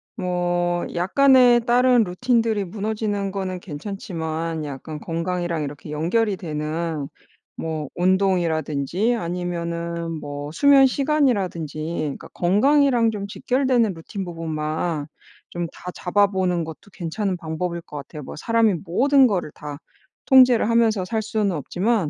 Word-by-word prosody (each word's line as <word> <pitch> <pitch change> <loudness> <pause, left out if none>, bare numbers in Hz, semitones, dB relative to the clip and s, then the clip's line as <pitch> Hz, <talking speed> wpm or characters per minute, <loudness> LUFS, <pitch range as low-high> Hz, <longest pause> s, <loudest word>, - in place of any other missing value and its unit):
뭐 175 -3 0
약간의 245 +6 +5
다른 245 0 +5
루틴들이 225 +2 0
무너지는 205 +1 -2
거는 190 -2 -3
괜찮지만 165 -2 -4
약간 150 +2 -7
건강이랑 170 0 -2
이렇게 145 +1 -7
연결이 190 +7 0
되는 155 -2 -3 0.5
뭐 160 -2 -4
운동이라든지 180 - +1
아니면은 170 -3 -3
뭐 145 0 -6
수면시간이라든지 265 - +3 0.2
그러니까 150 -3 -4
건강이랑 240 +5 +3
좀 200 -2 -5
직결되는 245 -1 +1
루틴 180 +4 -6
부분만 160 -2 -3 0.4
좀 175 -1 -3
다잡아보는 185 -1 0
것도 160 +4 -10
괜찮은 185 +3 -2
방법일 170 +1 -4
것 150 -3 -10
같아요. 145 +1 -8
뭐 - - -8
사람이 225 +3 +2
모든 265 +9 +4
거를 180 -8 -2
다 145 -1 -8 0.5
통제를 255 -5 +6
하면서 225 -4 +3
살 220 +3 -1
수는 215 -2 0
없지만 180 - 0
180 Hz, 300 characters per minute, -23 LUFS, 165-220 Hz, 0.5 s, 통제를